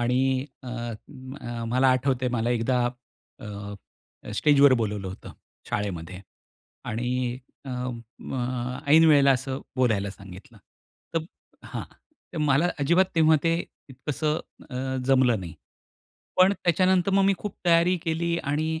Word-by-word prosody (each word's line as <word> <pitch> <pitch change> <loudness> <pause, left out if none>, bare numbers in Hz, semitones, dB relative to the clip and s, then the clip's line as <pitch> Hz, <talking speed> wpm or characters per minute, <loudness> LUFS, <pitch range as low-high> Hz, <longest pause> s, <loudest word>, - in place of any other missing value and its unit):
आणि 130 +2 +1 0.2
अ, 130 - -11
अ, 120 +1 -7
मला 130 +3 +3
आठवतंय 130 0 +1
मला 115 +2 0
एकदा 120 +1 +1 0.5
अ, 100 -1 -7 0.6
स्टेजवर 140 +2 +5
बोलावलं 105 -5 -2
होतं 95 - -9 0.4
शाळेमध्ये 95 -3 -3 0.6
आणि 125 +2 -2 0.3
अ, 135 - -6
अ, 125 0 -4
ऐनवेळेला 150 -3 +7
असं 130 +1 -2 0.2
बोलायला 110 -6 +1
सांगितलं. 100 +5 -13 0.6
तर 165 -1 0 0.4
हां. - - -5 0.5
तर 170 - -5
मला 150 +2 +3
अजिबात 170 +7 +4
तेव्हा 160 -1 +5
ते 165 0 +2 0.3
इतकसं 150 +4 -2 0.3
अ, - - -8 0.3
जमलं 130 -5 +4
नाही 85 -3 -8 0.8
पण 185 +2 +6
त्याच्यानंतर 185 0 +2
मग 195 0 +4
मी 195 - +4
खूप 210 - -5
तयारी 170 +2 +4
केली 170 +1 0
आणि 155 +3 -1
130 Hz, 120 wpm, -26 LUFS, 120-155 Hz, 0.8 s, ऐनवेळेला